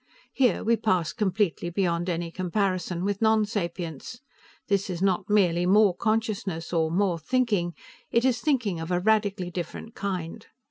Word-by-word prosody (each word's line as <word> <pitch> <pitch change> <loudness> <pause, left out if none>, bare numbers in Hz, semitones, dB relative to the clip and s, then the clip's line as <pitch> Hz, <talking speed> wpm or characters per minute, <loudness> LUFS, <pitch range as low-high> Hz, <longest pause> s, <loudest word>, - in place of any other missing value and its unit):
Here 255 -3 +2
we 230 +1 +3
pass 185 -8 0
completely 195 -4 0
beyond 175 -1 0
any 170 -1 -2
comparison 185 -1 -1
with 200 +1 -2
nonsapience. 205 - -1 0.5
This 200 -1 0
is 175 -2 -3
not 190 +1 0
merely 180 -4 +3
more 200 -1 +5
consciousness, 210 -7 -2
or 160 -2 +2
more 180 0 +1
thinking; 205 -4 0 0.3
it 235 +2 +2
is 245 -3 +2
thinking 235 - 0
of 165 +1 -5
a 180 -1 +1
radically 200 -3 +1
different 175 +5 -6
kind. 185 -5 -4
190 Hz, 145 wpm, -26 LUFS, 175-215 Hz, 0.5 s, more